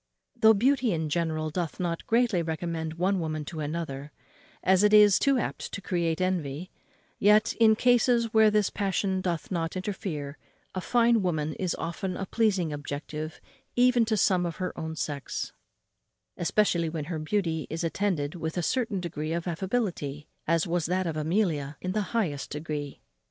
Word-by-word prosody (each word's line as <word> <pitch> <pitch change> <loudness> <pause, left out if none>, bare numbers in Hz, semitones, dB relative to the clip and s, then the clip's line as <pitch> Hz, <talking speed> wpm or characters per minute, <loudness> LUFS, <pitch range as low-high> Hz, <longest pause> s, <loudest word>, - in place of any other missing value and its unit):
Though 220 0 +6
beauty 245 0 +2
in 160 -2 -2
general 155 -1 -1
doth 170 -1 -3
not 170 -2 -2
greatly 230 -5 +3
recommend 160 0 -3
one 185 +3 +1
woman 155 -2 -3
to 160 - -6
another, 150 -2 -4 0.5
as 190 0 +4
it 210 0 +5
is 210 -2 +7
too 275 -1 +3
apt 240 - -3
to - - -3
create 170 -4 -1
envy, 180 -3 -2 0.5
yet, 210 +1 +5
in 220 -1 +6
cases 240 -1 +3
where 220 -1 +6
this 210 -2 +2
passion 190 -1 0
doth 170 -3 -3
not 165 -2 -2
interfere, 165 -7 -4 0.3
a 185 - -3
fine 235 +1 +3
woman 155 -4 -1
is 185 -2 -2
often 180 +2 -4
a 195 - -3
pleasing 190 -7 +1
object 145 +1 -6 0.6
even 245 -1 +5
to 220 -1 0
some 185 -2 +3
of 170 -1 -3
her 185 -1 -4
own 160 0 -5
sex, 145 -2 -4 0.8
especially 175 -2 +1
when 155 -2 -4
her 165 -1 -4
beauty 160 -1 -1
is 165 +2 -3
attended 165 -4 -1
with 160 -1 -4
a 175 - 0
certain 225 -4 -1
air 155 +2 -2
of 170 - -5
affability, 175 - -2 0.2
as 165 0 +2
was 175 -1 0
that 185 +2 0
of 165 -2 -2
Amelia 155 -3 0
in 185 - -3
the 210 +2 0
highest 175 -12 -1
degree. 150 -2 -5
175 Hz, 165 wpm, -28 LUFS, 160-205 Hz, 0.8 s, is